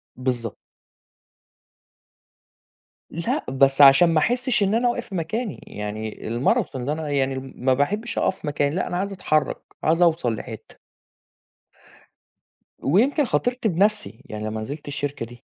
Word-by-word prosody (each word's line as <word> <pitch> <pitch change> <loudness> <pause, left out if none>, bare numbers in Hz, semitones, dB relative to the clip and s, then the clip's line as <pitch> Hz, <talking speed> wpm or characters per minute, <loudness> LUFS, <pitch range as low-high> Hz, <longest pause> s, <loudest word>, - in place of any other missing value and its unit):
بالضبط. 125 -4 -3 2.5
لأ 170 +1 -2
بس 135 +1 +3
عشان 140 +5 +8
ما 165 -1 +3
أحسش 245 - +1
إن 200 +1 +1
أنا 240 +1 +3
واقف 240 -3 -4
مكاني 195 +6 -3
يعني 105 +1 -6
الماراثون 125 +2 0
ده 145 - 0
أنا 155 -1 -4
يعني 135 -2 0 0.2
ما 130 +1 +2
باحبش 205 - -1
أقف 185 - 0
مكاني 145 0 0
لأ 185 - -1
أنا 175 - -2
عايز 200 +2 -2
أتحرك، 155 -6 0 0.3
عايز 165 +2 +2
أوصل 160 -9 +3
لحتة. - - -9 2.1
ويمكن 250 - +3
خاطرت 245 0 0
بنَفْسي 205 - 0
يعني 105 0 -6
لمّا 110 0 -3
نزلت 145 +8 -7
الشركة 145 -3 -3
دي. 120 +1 -14
150 Hz, 130 wpm, -23 LUFS, 130-195 Hz, 2.5 s, عشان